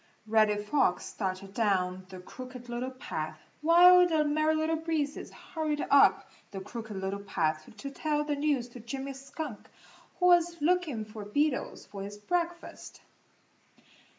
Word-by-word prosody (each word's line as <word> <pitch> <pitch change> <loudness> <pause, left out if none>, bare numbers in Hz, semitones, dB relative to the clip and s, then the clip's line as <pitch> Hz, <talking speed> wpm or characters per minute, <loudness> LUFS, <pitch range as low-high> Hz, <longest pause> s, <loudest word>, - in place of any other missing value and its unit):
Reddy 215 -1 +3
Fox 210 -2 +1
started 195 -1 -4
down 185 -4 0
the 185 -1 -9
Crooked 250 +5 -10
Little 240 +2 -3
Path 155 -12 -5 0.2
while 355 +3 +7
the 320 -3 +2
Merry 310 +1 +2
Little 315 +1 0
Breezes 315 -3 -2
hurried 310 -3 -3
up 275 -1 +5 0.2
the 195 - -6
Crooked 220 +1 -7
Little 190 +1 -3
Path 155 -6 -2
to 275 +6 -6
tell 295 +1 -1
the 295 -1 -1
news 285 -4 0
to 245 - -11
Jimmy 270 +4 -5
Skunk, 270 -2 -7 0.5
who 360 - +2
was 345 -1 +4
looking 305 -8 +1
for 215 0 -9
beetles 285 +7 -1
for 200 - -9
his 205 +1 -7
breakfast. 345 +8 -4
260 Hz, 145 wpm, -30 LUFS, 205-310 Hz, 0.5 s, while